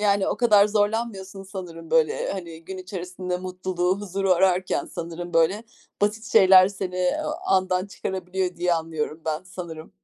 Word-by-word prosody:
Yani, 200 Hz, -2 st, +2 dB
o -, -, -1 dB
kadar 210 Hz, -4 st, +5 dB
zorlanmıyorsun 205 Hz, -2 st, -1 dB
sanırım 180 Hz, -4 st, -9 dB
böyle, 160 Hz, -1 st, +2 dB
hani, 165 Hz, -4 st, -7 dB
gün 190 Hz, +1 st, -7 dB
içerisinde 180 Hz, -1 st, -5 dB
mutluluğu, 185 Hz, 0 st, -2 dB
huzuru 195 Hz, -1 st, 0 dB
ararken 185 Hz, 0 st, +2 dB
sanırım, 170 Hz, +1 st, -6 dB
böyle, 190 Hz, +7 st, +3 dB, 0.4 s
basit 210 Hz, +2 st, 0 dB
şeyler 190 Hz, -3 st, +8 dB
seni, 190 Hz, -2 st, -5 dB
eee, 180 Hz, +8 st, +1 dB, 0.3 s
andan 185 Hz, 0 st, +2 dB
çıkarabiliyor 185 Hz, -2 st, -3 dB
diye 175 Hz, 0 st, +2 dB
anlıyorum 160 Hz, -1 st, -3 dB
ben 155 Hz, +2 st, -1 dB
sanırım. 170 Hz, -4 st, -8 dB
185 Hz, 145 wpm, -24 LUFS, 175-195 Hz, 0.4 s, şeyler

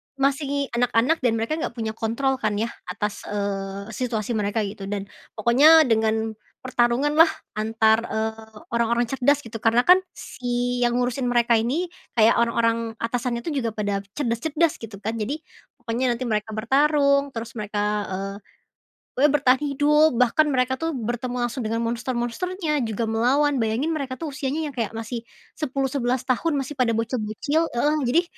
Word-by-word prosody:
masih 280 Hz, 0 st, 0 dB
anak-anak 245 Hz, +6 st, +2 dB
dan 245 Hz, -3 st, +1 dB
mereka 225 Hz, +4 st, -2 dB
gak -, -, -4 dB
punya 220 Hz, -2 st, -3 dB
kontrol, 245 Hz, +5 st, -1 dB
kan, 210 Hz, -1 st, 0 dB
ya, 225 Hz, +3 st, -1 dB, 0.2 s
atas, 210 Hz, -1 st, -4 dB
eee, 200 Hz, 0 st, -4 dB
situasi 230 Hz, -1 st, -2 dB
mereka 215 Hz, 0 st, 0 dB
gitu. 200 Hz, -1 st, -6 dB
Dan 200 Hz, -1 st, -3 dB, 0.3 s
pokoknya 285 Hz, +9 st, +6 dB
dengan 220 Hz, -2 st, +1 dB, 0.3 s
pertarunganlah, 260 Hz, +6 st, +3 dB, 0.3 s
antar, 220 Hz, +1 st, +2 dB
eee 220 Hz, 0 st, -4 dB, 0.2 s
orang-orang 235 Hz, +1 st, +2 dB
cerdas 270 Hz, +4 st, +1 dB
gitu. 225 Hz, -1 st, -7 dB
Karena, 230 Hz, +3 st, +3 dB
kan, 365 Hz, +1 st, +7 dB, 0.2 s
si 245 Hz, 0 st, -3 dB
yang 240 Hz, 0 st, +2 dB
ngurusin 245 Hz, +1 st, 0 dB
mereka 235 Hz, -1 st, +3 dB
ini 310 Hz, +10 st, -1 dB, 0.2 s
kayak 225 Hz, 0 st, +5 dB
orang-orang 230 Hz, -1 st, +1 dB
atasannya 235 Hz, 0 st, -2 dB
itu 325 Hz, -, -3 dB
juga 230 Hz, -3 st, -3 dB
pada 205 Hz, -2 st, -1 dB, 0.2 s
cerdas-cerdas 295 Hz, +5 st, 0 dB
gitu, 220 Hz, -3 st, -8 dB
kan. 220 Hz, -, -1 dB
Jadi, 280 Hz, +9 st, -3 dB, 0.3 s
pokoknya 240 Hz, +1 st, -1 dB
nanti 255 Hz, -, -5 dB
mereka 215 Hz, -2 st, -2 dB
bertarung, 280 Hz, +4 st, +3 dB
terus 230 Hz, 0 st, -5 dB
mereka, 210 Hz, 0 st, -2 dB, 0.3 s
eee, 195 Hz, +1 st, -4 dB, 0.8 s
we 290 Hz, -, +6 dB
bertahan 270 Hz, -3 st, +3 dB
hidup. 295 Hz, +1 st, +3 dB
Bahkan 250 Hz, +6 st, +3 dB
mereka, 260 Hz, -2 st, +1 dB
tuh, 325 Hz, -1 st, -2 dB
bertemu 245 Hz, +1 st, -3 dB
langsung 240 Hz, -1 st, -2 dB
dengan 230 Hz, +1 st, -1 dB
monster-monsternya 255 Hz, -, -2 dB
juga 220 Hz, +1 st, -3 dB
melawan. 265 Hz, +5 st, +2 dB
Bayangin 230 Hz, +8 st, 0 dB
mereka, 275 Hz, -5 st, -3 dB
tuh, 315 Hz, +1 st, -5 dB
usianya 290 Hz, +2 st, -3 dB
yang -, -, -15 dB
kayak 225 Hz, -2 st, -2 dB
masih 230 Hz, +1 st, -5 dB, 0.3 s
10 275 Hz, -3 st, -1 dB
11 255 Hz, -2 st, 0 dB
tahun. 290 Hz, +5 st, 0 dB
Masih 275 Hz, +1 st, -3 dB
pada 235 Hz, -3 st, +2 dB
bocil-bocil 230 Hz, +7 st, -1 dB
heeh. 295 Hz, +3 st, 0 dB
Jadi, 315 Hz, +8 st, +3 dB
240 Hz, 155 wpm, -24 LUFS, 225-275 Hz, 0.8 s, kan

